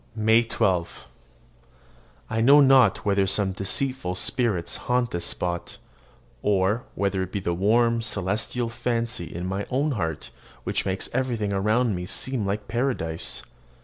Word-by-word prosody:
MAY 110 +1 +4
12. 90 -6 -1 1.2
I 110 0 -1
know 140 +5 +7
not 135 -3 +5
whether 100 -1 +2
some 95 0 +2
deceitful 95 +1 -1
spirits 100 -6 0
haunt 125 -1 +1
this 85 0 -3
spot, 85 -1 -3 0.6
or 105 +3 +1
whether 100 -1 -1
it 95 0 -4
be 100 - -2
the 85 -3 -2
warm, 115 +5 +2
celestial 110 +3 -1
fancy 115 -5 -2
in 85 +2 -6
my 95 +2 -3
own 140 +4 0
heart 80 - -3 0.3
which - - -1
makes 95 0 0
everything 120 -5 -1
around 110 +4 +1
me 90 -1 -4
seem 120 -1 0
like 105 +1 -3
paradise. 115 -10 -1
105 Hz, 140 wpm, -25 LUFS, 95-120 Hz, 1.2 s, know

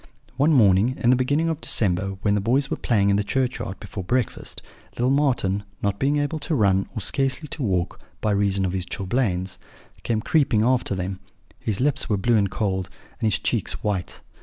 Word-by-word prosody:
"One 145 +4 +3
morning 110 -2 +4
in 120 - +4
the - - +5
beginning 145 +6 +1
of 160 -1 -2
December, 95 -1 +2
when 100 - +3
the 105 - +1
boys 135 +6 +1
were - - 0
playing 100 -4 +2
in 100 - +3
the 105 - +1
churchyard 120 -4 -2
before 95 - -7
breakfast, 125 +5 -2 0.3
little 125 +2 +1
Marten, 125 -9 +1 0.2
not 100 -1 0
being 140 +2 +2
able 145 +2 -1
to 155 +2 -2
run, 95 -5 +2
or 110 - -3
scarcely 135 - -1
to 150 - -6
walk, 90 -7 -1 0.2
by 105 - 0
reason 100 -1 +1
of 90 - -2
his 90 -1 -3
chilblains, 95 -2 -1 0.4
came 110 -2 -1
creeping 130 -6 +2
after 125 -4 +1
them; 95 0 -4 0.4
his 105 -3 -2
lips 140 0 +1
were 105 - +2
blue 115 +5 +2
and 100 -2 +2
cold, 95 -2 -2 0.3
and 110 - +1
his - - +1
cheeks - - -2
white. 100 -4 -2
105 Hz, 195 wpm, -24 LUFS, 95-130 Hz, 0.4 s, the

